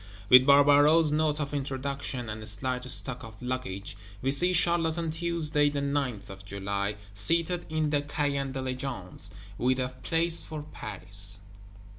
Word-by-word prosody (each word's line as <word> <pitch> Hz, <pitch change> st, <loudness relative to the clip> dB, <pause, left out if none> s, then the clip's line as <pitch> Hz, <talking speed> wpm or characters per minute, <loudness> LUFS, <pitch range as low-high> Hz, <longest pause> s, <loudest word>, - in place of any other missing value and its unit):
With 130 Hz, +1 st, +8 dB
Barbaroux's 145 Hz, +3 st, +6 dB
Note 150 Hz, 0 st, +1 dB
of 145 Hz, 0 st, -4 dB
Introduction, 135 Hz, -2 st, -3 dB
and 110 Hz, 0 st, -6 dB
slight 125 Hz, +4 st, -2 dB
stock 125 Hz, 0 st, -1 dB
of 110 Hz, -1 st, -11 dB
luggage, 125 Hz, -7 st, -4 dB, 0.3 s
we 135 Hz, -, +2 dB
see 175 Hz, +6 st, +2 dB
Charlotte 170 Hz, -2 st, +2 dB
on 165 Hz, -2 st, -1 dB
Tuesday 160 Hz, -3 st, +1 dB
the 145 Hz, 0 st, -2 dB
9th 140 Hz, -8 st, -2 dB
of 95 Hz, 0 st, -11 dB
July 100 Hz, +1 st, -3 dB, 0.2 s
seated 165 Hz, -, 0 dB
in 155 Hz, -1 st, 0 dB
the 145 Hz, -1 st, +2 dB
Caen 145 Hz, -2 st, -1 dB
Diligence, 130 Hz, -7 st, -5 dB, 0.3 s
with 130 Hz, +1 st, +2 dB
a 125 Hz, 0 st, -1 dB
place 165 Hz, +6 st, 0 dB
for 155 Hz, -2 st, -6 dB
Paris. 100 Hz, -6 st, -2 dB
140 Hz, 145 wpm, -28 LUFS, 115-150 Hz, 0.3 s, With